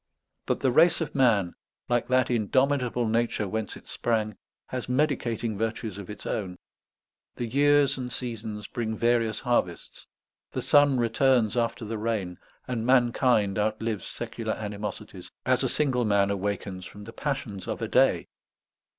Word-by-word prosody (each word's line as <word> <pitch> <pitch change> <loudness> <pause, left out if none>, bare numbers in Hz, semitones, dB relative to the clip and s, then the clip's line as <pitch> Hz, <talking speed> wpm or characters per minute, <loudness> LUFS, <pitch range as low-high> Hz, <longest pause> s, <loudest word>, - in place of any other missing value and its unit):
But - - 0
the 130 - +3
race 165 +5 +5
of 165 - -3
man, 110 -10 +3 0.3
like 120 -1 +1
that 130 0 +2
indomitable 125 +1 +1
nature 115 -2 0
whence 110 +1 -3
it - - -17
sprang, 110 -3 -1 0.3
has 125 -1 -5
medicating 120 -5 0
virtues 110 -2 -3
of 100 - -9
its 105 - -8
own; 90 -4 -3 0.8
the 120 - -3
years 140 +2 +3
and 125 -1 -4
seasons 110 -4 -5
bring 110 -2 -3
various 115 -2 +1
harvests; 120 -9 -2 0.5
the - - -2
sun 145 -3 +5
returns 120 -1 +2
after 115 -1 -1
the 110 0 -4
rain; 105 -6 -2 0.3
and 120 -3 -2
mankind 120 -4 +3
outlives 110 0 -1
secular 115 -1 -4
animosities, 105 -2 -6 0.2
as - - +2
a - - +1
single 130 -5 +1
man 100 -2 +2
awakens 100 -1 -3
from 105 - -11
the 115 +2 -10
passions 130 -9 -4
of - - -3
a - - -2
day. - - +3
115 Hz, 150 wpm, -27 LUFS, 105-125 Hz, 0.8 s, race